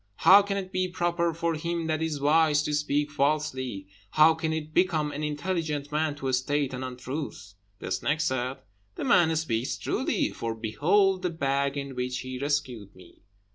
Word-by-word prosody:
How 200 +2 +9
can 200 0 -2
it 190 -1 -5
be 185 0 0
proper 175 -1 0
for 165 +1 -1
him 170 +1 -3
that 155 0 -1
is 160 -3 -2
wise 150 +1 +3
to 150 - -2
speak 150 0 0
falsely? 135 -7 -1 0.2
How 155 +5 +6
can 160 0 -2
it 155 -1 -4
become 160 -5 +2
an 145 +1 -5
intelligent 150 -1 -2
man 150 0 0
to 135 -2 -3
state 135 +2 0
an 130 +1 -4
untruth?" 130 -4 -6 0.2
The - - -7
snake 150 +3 0
said, 130 -3 -1 0.4
"The - - -5
man 160 -2 +4
speaks 130 -6 -1
truly, - - -1
for 115 -1 -4
behold 180 - +2
the 180 - 0
bag 140 -3 -1
in 140 -1 -4
which 125 0 -3
he 130 0 -6
rescued 130 -8 -2
me." 90 -2 -17
150 Hz, 175 wpm, -27 LUFS, 130-160 Hz, 0.4 s, How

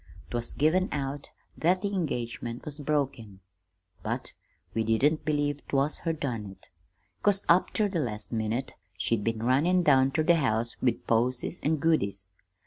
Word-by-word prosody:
"'Twas 120 -1 -2
given 175 +6 +2
out 140 0 -3 0.3
that 180 +4 +2
the 200 0 -1
engagement 120 -8 -3
was 150 0 -2
broken, 135 -9 -2 0.6
but - - -3 0.4
we 115 - +1
didn't 135 +8 +2
believe 145 -1 0
't - - -3
was 140 +3 +2
her 165 - -1
done 125 -9 -3
it, 95 - -14 0.5
'cause 200 -1 +2
up 175 +2 +4
ter 215 - +2
the 190 -4 -2
last 110 -7 -4
minute 115 +3 -2 0.2
she'd 105 +3 0
been 115 0 -1
runnin' 160 +9 +3
down 135 -4 +5
ter 155 +3 0
the 170 +1 +5
house 115 -5 0
with 125 -3 0
posies 125 +7 0
and 155 0 +1
goodies. 100 - 0
135 Hz, 160 wpm, -28 LUFS, 115-160 Hz, 0.6 s, down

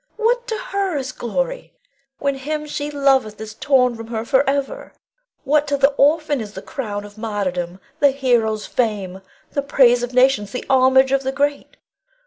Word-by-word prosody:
What 480 +2 +1
to 450 - -2
her 400 -9 -2
is 265 -1 -4
glory, - - -4 0.4
when 280 0 0
him 300 +3 -4
she 290 0 -4
loveth 270 -7 +1
is 220 0 -7
torn 250 -1 +2
from 225 0 -9
her 225 -1 -4
forever? 275 +1 0 0.5
What 295 +1 +2
to 285 0 0
the 275 +1 +4
orphan 290 -1 +2
is 210 -2 -8
the - - -7
crown 205 -6 -5
of 205 +1 -13
martyrdom, 185 -5 -3 0.2
the 285 - +5
hero's 240 -6 0
fame, 200 -6 -2 0.3
the 280 - -1
praise 255 -3 +4
of 245 0 -3
nations, 250 -5 +2
the 250 - -4
homage 265 0 +4
of 275 0 +2
the 265 0 -2
great? 285 +1 -2
265 Hz, 170 wpm, -20 LUFS, 225-290 Hz, 0.5 s, the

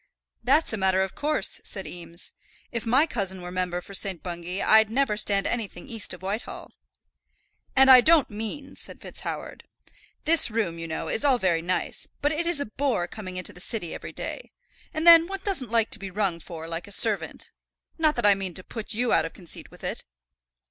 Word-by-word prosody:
"That's 310 -6 +3
a - - -1
matter 190 -1 +2
of 190 - -4
course," 300 +1 0
said - - -5
Eames. 170 0 -5 0.4
"If 230 -1 -3
my 265 +7 +5
cousin 195 - -3
were 180 - -6
Member 180 -1 -2
for 200 - -12
St. 195 -3 -1
Bungay, 175 +1 -5
I'd 220 0 +5
never 245 -2 +1
stand 200 -2 +1
anything 230 +3 -3
east 225 -5 -4
of - - -8
Whitehall." 200 +4 -5 1.0
"And 265 0 +7
I 255 -1 +10
don't 315 +1 +5
mean," 225 +7 -6
said - - -5
FitzHoward. - - -6 0.6
"This 325 -3 +6
room, 210 -7 -1
you 165 - -5
know, 160 - -4
is - - 0
all 275 -3 +4
very 175 -7 +1
nice; 180 +2 -2
but 290 - +1
it 330 +2 -1
is 345 -4 0
a 285 - -1
bore 225 -5 -1
coming 185 -2 -7
into 185 - -3
the 180 - -10
City 200 -5 -2
every - - -7
day. - - -6 0.4
And 315 +1 -3
then 335 -1 +9
one 390 0 -5
doesn't 330 - -1
like 225 -1 +1
to - - +1
be 195 -1 -6
rung 190 -3 -1
for 165 -1 -8
like 165 +2 -5
a - - -12
servant. 210 +1 +2 0.5
Not 310 -2 +3
that 240 - -1
I 205 - +7
mean 190 -2 -5
to 185 - -1
put 220 0 -6
you 240 +1 +1
out 160 - +4
of 165 - -6
conceit 175 -4 -5
with - - -16
it." - - -3
210 Hz, 205 wpm, -26 LUFS, 185-265 Hz, 1.0 s, I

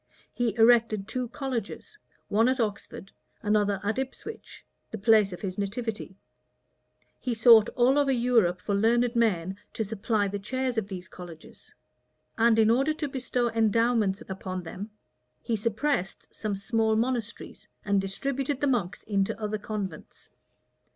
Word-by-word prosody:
He 235 -4 -1
erected 225 -3 +4
two 250 +2 -3
colleges, 250 - -5 0.3
one 225 +4 +3
at 260 0 0
Oxford, 200 -3 -4 0.3
another 205 -2 +1
at 210 +5 -1
Ipswich, 340 - -7 0.2
the 220 - -5
place 215 -1 +4
of 180 - -8
his 190 -1 -4
nativity: 205 -1 -4 1.0
he 245 -2 -2
sought 225 -1 +7
all 255 +4 +4
over 280 -2 +2
Europe 235 -8 +2
for 205 - -2
learned 235 +4 +2
men 190 -5 +1 0.2
to 220 - -2
supply 210 0 -1
the 200 +1 -4
chairs 255 +3 -1
of 205 - -6
these 185 -2 -7
colleges; 175 -4 -12 0.6
and 230 0 +4
in 220 0 +5
order 270 +6 +2
to 305 -1 -3
bestow 250 -2 -1
endowments 225 -2 +2 0.2
on 185 -1 -4
them, 190 +5 -7 0.5
he 230 - -1
suppressed 220 -1 -2
some 215 -2 -3
smaller 220 +2 +1
monasteries, 230 -1 -3 0.2
and 200 -1 +2
distributed 270 +8 -2
the 290 - +1
monks 200 -11 -1
into 200 0 -1
other 215 0 -3
convents. 200 -6 -7
220 Hz, 145 wpm, -27 LUFS, 200-245 Hz, 1.0 s, sought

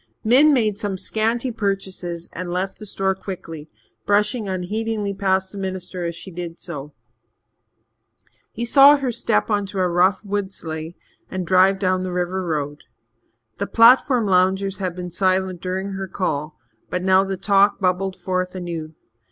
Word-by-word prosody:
Min 265 +7 +6
made 215 -7 +1
some 200 -2 -3
scanty 230 +6 -1
purchases 190 -5 -3
and 180 0 -5
left 185 +2 -3
the 215 - -7
store 190 0 0
quickly, 165 -5 -8 0.3
brushing 210 +2 +1
unheedingly 205 +3 -2
past 190 -1 0
the 200 - -7
minister 185 -1 -4
as 170 -1 -3
she 190 - -9
did 170 -1 -7
so. 150 -4 -7 1.6
He 235 - -4
saw 280 +4 +7
her 270 -3 -2
step 230 -1 0
on 205 -1 +1
a 185 -2 0
rough 185 +4 +2
wood 200 -1 -2
sleigh 160 -1 -6 0.3
and 185 -1 -4
drive 190 +2 +4
down 185 -1 +1
the 185 0 -3
river 180 +1 -2
road. 150 -3 -3 0.8
The - - -1
platform 240 +1 +5
loungers 190 +1 +2
had 185 -3 -2
been 180 -1 -6
silent 185 0 0
during 190 +2 -3
her 195 0 -4
call, 155 -5 -3 0.3
but 180 0 -2
now 190 0 +5
the 195 -1 -3
talk 200 +1 +3
bubbled 185 0 0
forth 185 0 -3
anew. 165 -3 -5
190 Hz, 155 wpm, -22 LUFS, 180-205 Hz, 1.6 s, saw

